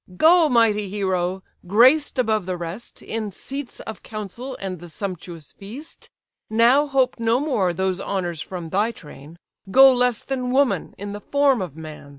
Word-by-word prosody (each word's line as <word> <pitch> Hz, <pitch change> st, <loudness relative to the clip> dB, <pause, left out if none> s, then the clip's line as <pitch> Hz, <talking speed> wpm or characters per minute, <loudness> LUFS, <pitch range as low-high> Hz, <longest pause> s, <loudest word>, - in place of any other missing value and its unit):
"Go, 330 Hz, -, +6 dB
mighty 215 Hz, -5 st, +2 dB
hero! 190 Hz, -2 st, -1 dB, 0.2 s
graced 260 Hz, -, +4 dB
above 220 Hz, -6 st, +1 dB
the 185 Hz, -1 st, -2 dB
rest 175 Hz, +7 st, -8 dB
In 220 Hz, -2 st, -4 dB
seats 270 Hz, +6 st, -7 dB
of 220 Hz, -, -8 dB
council 225 Hz, +5 st, -7 dB
and 185 Hz, -3 st, -5 dB
the 175 Hz, +1 st, -11 dB
sumptuous 175 Hz, -4 st, -7 dB
feast: 235 Hz, +11 st, -11 dB, 0.4 s
Now 240 Hz, +7 st, +4 dB
hope 265 Hz, -3 st, +1 dB
no 230 Hz, +1 st, +2 dB
more 255 Hz, -, 0 dB
those 190 Hz, +1 st, -2 dB
honours 175 Hz, -6 st, -3 dB
from 175 Hz, -3 st, -6 dB
thy 205 Hz, +6 st, +1 dB
train; 150 Hz, -4 st, -13 dB, 0.3 s
Go 265 Hz, +5 st, +8 dB
less 245 Hz, -2 st, +1 dB
than 255 Hz, -2 st, -3 dB
woman, 265 Hz, 0 st, +1 dB
in 200 Hz, +1 st, -6 dB
the 205 Hz, -, -7 dB
form 280 Hz, -3 st, +2 dB
of 175 Hz, -6 st, -5 dB
man! 155 Hz, -3 st, -10 dB
210 Hz, 160 wpm, -22 LUFS, 185-255 Hz, 0.4 s, Go